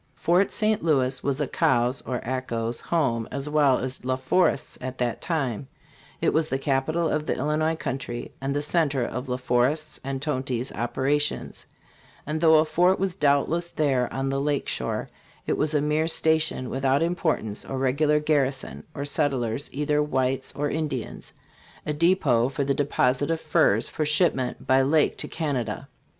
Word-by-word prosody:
Fort 180 +4 +2
St. 215 0 +1
Louis 135 -5 +1
was 140 0 -1
Acau's 125 -3 +1
(or 125 -1 -3
Ako's) 120 -2 -2
home 130 -9 0
as 140 +2 -3
well 145 -3 +3
as 130 -1 -4
La 130 0 0
Forest's 140 +4 +1
at 130 0 -5
that 120 -2 -2
time; 135 - -2 0.5
it - - +2
was 155 0 +1
the 135 - 0
capital 145 +5 0
of 150 0 -1
the - - 0
Illinois 155 +3 0
country 135 -6 -5
and 135 +1 -2
the 145 - 0
centre 145 -5 +1
of 125 +3 -5
La 125 - -1
Forest's 130 +5 0
and 135 0 -3
Tonty's 130 -3 -2
operations; 135 +5 -1 0.6
and 155 +2 -3
though 160 -1 +6
a 155 0 +5
fort 180 +4 +3
was 190 -1 -1
doubtless 165 +1 +1
there 135 -7 0
on 135 0 -2
the 135 0 -1
lake 145 -1 -1
shore, - - -2 0.4
it - - 0
was 155 0 0
a 145 - +3
mere 150 +2 +1
station 160 -5 +1
without 135 +3 +1
importance 160 - -1
or 135 - -5
regular 145 +3 +2
garrison 145 -3 0
or 140 -1 -3
settlers, 140 -4 -1
either 150 +1 0
whites 130 -2 -1
or 145 +1 -1
Indians, 145 -5 -4 0.5
a 150 - -1
depot 145 -7 +3
for 140 +1 -2
the 140 0 +1
deposit 135 0 +1
of 165 -1 0
furs 160 0 +2
for 155 - -3
shipment 150 -5 +1
by 130 0 +4
lake 150 +3 +2
to - - -3
Canada. 130 - -3
140 Hz, 165 wpm, -25 LUFS, 130-155 Hz, 0.6 s, though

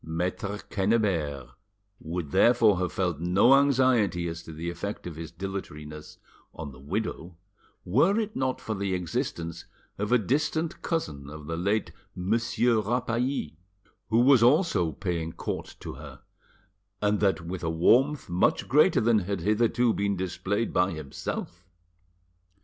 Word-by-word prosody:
Maitre 90 +5 -3
Quennebert 95 - 0 0.5
would 80 -2 -5
therefore 115 - +5
have 90 -3 -1
felt 90 -2 -1
no 95 +9 +4
anxiety 130 -10 +3
as 85 0 -5
to 80 - -11
the 80 +2 -6
effect 100 +4 -5
of 85 -3 -6
his 80 -1 -7
dilatoriness 75 -5 -7 0.4
on 75 -3 -6
the 65 - -14
widow, 85 +2 -4 0.5
were 155 - +3
it 220 -1 -3
not 130 -1 -1
for 110 - -4
the 100 -2 -1
existence 85 -1 -3 0.3
of 105 +2 -2
a 125 - +6
distant 150 - -1
cousin 75 - -3
of 75 0 -9
the 80 +2 -3
late 100 +6 0 0.2
Monsieur 115 +4 +1
Rapally, 120 - -1 0.5
who 115 +2 +4
was 130 -1 +6
also 125 - +3
paying 80 0 -3
court - - -5
to - - -6
her, - - -11 0.8
and 105 0 +1
that 100 -3 +2
with 85 +2 -6
a 80 - 0
warmth 125 - +3
much 90 +1 +1
greater 150 +3 +4
than 115 -1 +4
had 100 -1 -3
hitherto 115 +4 +2
been 100 -1 -1
displayed 95 +4 -2
by 90 +1 +2
himself. 75 -4 -6
95 Hz, 145 wpm, -27 LUFS, 85-120 Hz, 0.8 s, a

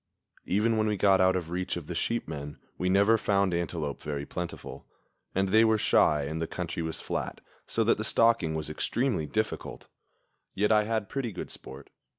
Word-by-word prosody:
Even 110 +4 +2
when 110 - +2
we 105 -1 0
got 95 -1 +4
out 95 0 +4
of 85 -3 -3
reach 90 0 -2
of 85 - -6
the 90 - -5
sheep 115 +8 -1
men 75 -2 -6 0.2
we 90 - -1
never 100 +4 +4
found 100 -3 +2
antelope 85 -4 -2
very 70 -1 -4
plentiful, 90 +1 -7 0.5
and 95 0 +1
they 110 +3 +6
were 110 -1 +4
shy, 75 -7 +3
and 80 +3 -3
the 80 - -1
country 85 -1 -4
was 80 0 -4
flat, - - -4 0.3
so - - +1
that - - +2
the - - -1
stalking 115 -9 +3
was 80 -1 -3
extremely 100 - -1
difficult; 110 +4 -3 0.7
yet 105 +2 +2
I 105 -1 +4
had 110 -2 -1
pretty 130 -2 -3
good - - -6
sport. 70 +1 -10
95 Hz, 190 wpm, -28 LUFS, 80-110 Hz, 0.7 s, they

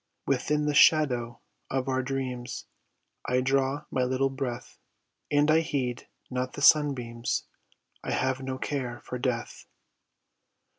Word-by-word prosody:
Within 150 0 +1
the 150 - +1
shadow 140 -7 +4 0.3
of 135 0 -1
our 130 -1 +1
dreams 130 -2 -4 0.6
I 125 +1 +3
draw 135 +2 +1
my 130 - +1
little 130 +2 +1
breath 130 -3 -5 0.5
And 145 +1 +3
I 160 - +5
heed 130 -6 -2 0.2
not 125 0 -2
the 145 - -6
sunbeams, 125 -7 +3 0.6
I - - -5
have 130 0 0
no 130 0 -4
care 130 -4 -3
for 125 - -6
death. 125 -2 -3
130 Hz, 130 wpm, -28 LUFS, 125-145 Hz, 0.6 s, I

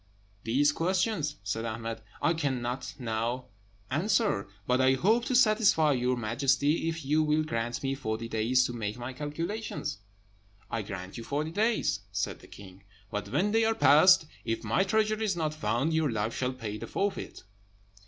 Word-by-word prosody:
"These 140 +6 +3
questions," 175 -2 0
said 105 +2 -2
Ahmed, 115 0 -4 0.2
"I 165 - +4
cannot 130 -5 -2
now 120 +1 -3 0.4
answer; 190 - +1 0.2
but 125 +1 +2
I 130 0 +5
hope 220 - +2
to 255 - 0
satisfy 215 - +4
your 125 -1 +1
Majesty, 135 +7 +1
if 160 -3 -5
you 150 +3 +3
will 155 0 +2
grant 120 -4 -3
me 135 0 0
forty 115 -4 -3
days 115 +3 +2
to 120 - -3
make 110 -1 -4
my 120 +2 -6
calculations." 150 - -4 0.7
"I 115 - -1
grant 95 +1 -7
you - - -7
forty 150 +5 -2
days," 215 - +1
said 95 0 -2
the - - -15
king; 95 -1 -13 0.3
"but 105 0 -4
when 180 - +1
they 225 +1 +3
are 225 0 +2
past, 160 +1 +6 0.2
if 115 0 -2
my 110 - +1
treasure 215 +2 +1
is 210 -4 +1
not 155 -3 -1
found, 155 0 0
your 160 -2 +2
life 110 +1 -2
shall 130 0 -1
pay 110 -4 -6
the - - -6
forfeit." 200 0 -3
135 Hz, 170 wpm, -29 LUFS, 115-165 Hz, 0.7 s, past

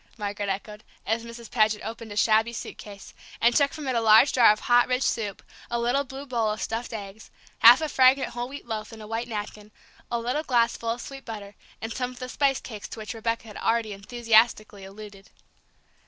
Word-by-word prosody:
Margaret 205 -1 -3
echoed, 210 +2 -5 0.2
as 225 +1 -1
Mrs. 235 -1 -10
Paget 215 -2 +2
opened 225 -1 -7
a 205 - -7
shabby 220 +2 +3
suitcase, 205 -3 -9 0.3
and 235 +1 +3
took 285 -1 +3
from 300 -3 -7
it 260 - 0
a 230 - +2
large 225 +5 +6
jar 240 -4 +7
of 215 - -2
hot 240 0 +4
rich 255 +1 0
soup, 210 -4 -2 0.3
a 235 - -1
little 245 +4 +1
blue 270 +1 -9
bowl 235 -5 0
of 215 0 -3
stuffed 230 +2 -4
eggs, 205 -1 -8 0.3
half 240 +5 +9
a 315 - 0
fragrant 265 -1 +4
whole 240 +1 -5
wheat 285 +1 -9
loaf 220 -2 -5
in 225 - -11
a 215 - -9
white 225 +2 -4
napkin, 210 -1 -6 0.4
a 235 - -1
little 245 +6 -1
glass 240 -6 +2
full 230 - -5
of 235 +1 -2
sweet 270 +1 -9
butter, 210 -3 -8 0.3
and 225 0 -4
some 250 -1 -2
of 250 - -13
the 255 -1 -6
spice 275 0 +1
cakes 215 -4 -8
to - - -9
which 215 +1 -6
Rebecca 230 0 -3
had 210 - -10
already 225 -2 0
enthusiastically 220 -1 +1
alluded. 200 0 -12
230 Hz, 215 wpm, -26 LUFS, 215-245 Hz, 0.4 s, half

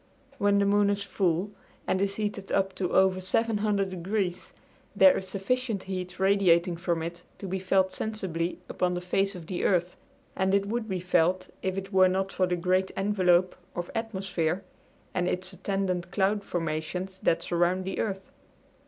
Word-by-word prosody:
When 200 0 +3
the 200 - +3
moon 205 0 +3
is 200 0 0
full 185 0 0 0.3
and 185 - 0
is 200 0 0
heated 205 -2 -3
up 195 -1 +1
to 180 -2 -2
over 190 0 +3
700 205 0 0
degrees 185 0 -2 0.4
there 280 -1 +7
is 190 - -3
sufficient 205 +2 -1
heat 185 -1 -5
radiating 185 -3 +4
from 170 -1 -1
it 170 +1 -6 0.2
to - - -8
be 190 +1 -2
felt 190 0 +2
sensibly 180 -6 -2
upon 180 -1 0
the - - -1
face 195 +2 0
of 175 -3 -8
the 180 +1 -3
earth, 180 -2 +1 0.4
and 190 +1 +2
it 200 0 +2
would 220 +1 -3
be 185 -2 -2
felt 180 0 +2
if 190 0 -2
it 195 +1 -5
were 185 -1 +6
not 190 +1 -1
for 185 - +1
the 180 - 0
great 185 +2 +1
envelope 185 -3 +3 0.2
of 175 0 -4
atmosphere 195 -6 -2 0.5
and 180 -1 0
its 185 +1 -2
attendant 185 -2 -2
cloud 200 +2 +1
formations 175 +2 -3
that 165 - +2
surround 175 +2 +1
the 190 - -3
earth. 195 -3 -3
190 Hz, 170 wpm, -28 LUFS, 180-200 Hz, 0.5 s, there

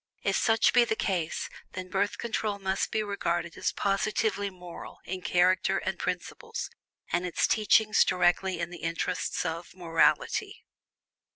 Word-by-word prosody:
If - - +1
such 225 -1 +3
be 245 - +7
the 220 - 0
case, 180 -7 -1 0.3
then 185 0 -5
Birth 200 +2 0
Control 220 -3 -2
must 190 -1 -1
be 215 - 0
regarded 175 -4 -2
as - - -1
positively 200 +1 0
"moral" 180 -2 -10
in 185 0 -4
character 180 +1 +3
and - - -3
principles, 460 -1 -4 0.4
and 175 +1 +1
its 180 -2 +1
teachings 215 0 +4
directly 180 0 +2
in 170 0 -3
the 175 - -8
interests 165 +3 -2
of 165 +2 -4
"morality." 165 -3 +1
185 Hz, 145 wpm, -28 LUFS, 175-210 Hz, 0.4 s, be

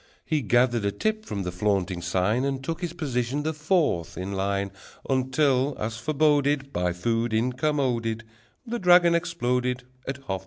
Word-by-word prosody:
He 155 -3 0
gathered 120 -1 +2
a 100 - +1
tip 215 - -2
from 100 -2 -3
the 90 - -3
flaunting 95 -1 0
sign, 95 +8 +1
And 135 -1 -2
took 165 +4 -4
his 175 -2 -2
position 140 -4 -2
the 160 +1 -1
fourth 150 - 0
in 95 +2 -4
line, 100 0 -1 0.4
Until, 135 +1 +2
as 110 +1 -3
foreboded, 145 0 +1
By 90 0 0
food 115 +6 -1
incommoded, 125 -2 0 0.4
The 240 +1 -3
dragon 175 -2 +6
exploded 125 -6 0 0.2
At 135 - -2
half 135 - -22
past - - -23
nine. 95 0 0
125 Hz, 165 wpm, -26 LUFS, 105-150 Hz, 0.4 s, dragon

